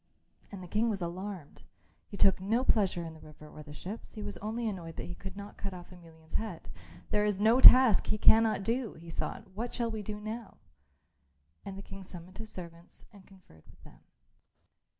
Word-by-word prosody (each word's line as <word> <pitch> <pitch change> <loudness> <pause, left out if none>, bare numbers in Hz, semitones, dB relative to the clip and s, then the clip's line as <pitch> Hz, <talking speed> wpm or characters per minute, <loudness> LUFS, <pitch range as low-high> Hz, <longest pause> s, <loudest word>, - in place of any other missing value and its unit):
And 195 -3 -8
the - - -9
King 215 +6 +1
was 205 -3 -2
alarmed. 180 -2 -6 0.5
He 200 - -9
took 195 -1 +4
no 225 +6 +1
pleasure 195 -8 +2
in 165 - -7
the 160 - -14
river 155 0 -14
or 150 - -11
the 150 0 -11
ships, 185 +9 -8
he 215 - -6
was 205 0 -5
only 225 +3 -3
annoyed 170 -6 -5
that - - -5
he 175 - -6
could 195 +1 -9
not 205 0 -9
cut 195 -2 -4
off 175 0 -11
Emelian's 165 -3 -16
head. 180 - -4 0.4
"There 210 0 +2
is 210 -2 +1
no 225 +5 +4
task 255 -6 +9
he 215 - 0
cannot 220 -1 +5
do," 230 +2 -1
he 165 +1 -11
thought. 210 +5 -4
"What 230 +5 -5
shall 235 -2 -1
we 220 -1 -4
do 210 +1 -5
now?" 220 +1 -7 1.1
And 195 -1 -7
the 195 - -8
King 195 0 -10
summoned 185 +1 -11
his 220 0 -7
servants 170 -1 -11
and 200 -2 -16
conferred 185 - -20
with - - -19
them. - - -16
195 Hz, 205 wpm, -31 LUFS, 175-215 Hz, 1.1 s, task